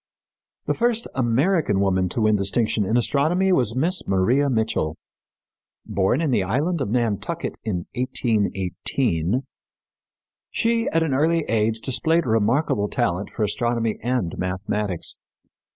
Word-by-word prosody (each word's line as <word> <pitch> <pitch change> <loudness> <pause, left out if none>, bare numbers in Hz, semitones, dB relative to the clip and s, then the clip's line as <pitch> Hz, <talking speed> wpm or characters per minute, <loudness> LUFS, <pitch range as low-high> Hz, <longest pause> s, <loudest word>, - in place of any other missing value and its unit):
The - - +1
first 235 -1 0
American 130 - +1
woman 95 -2 +1
to 115 - -2
win 110 0 +4
distinction 105 +1 +1
in 115 - +2
astronomy 160 +10 +2
was 125 -8 +1
Miss 170 +8 0
Maria 120 +10 +2
Mitchell. 110 - 0 0.9
Born 100 +9 +1
in 155 -4 0
the 120 - +2
island 145 - 0
of 120 - -1
Nantucket 120 - -1
in 90 -6 -3
1818, 110 -3 -1 1.1
she, 230 0 0
at 165 0 +2
an 155 -4 -1
early 160 +5 +2
age, 110 0 +1
displayed 160 +5 +1
remarkable 115 0 +1
talent 100 -6 -1
for 110 - -3
astronomy 115 +1 -1
and 120 -7 -1
mathematics. 95 0 -2
115 Hz, 125 wpm, -23 LUFS, 100-145 Hz, 1.1 s, win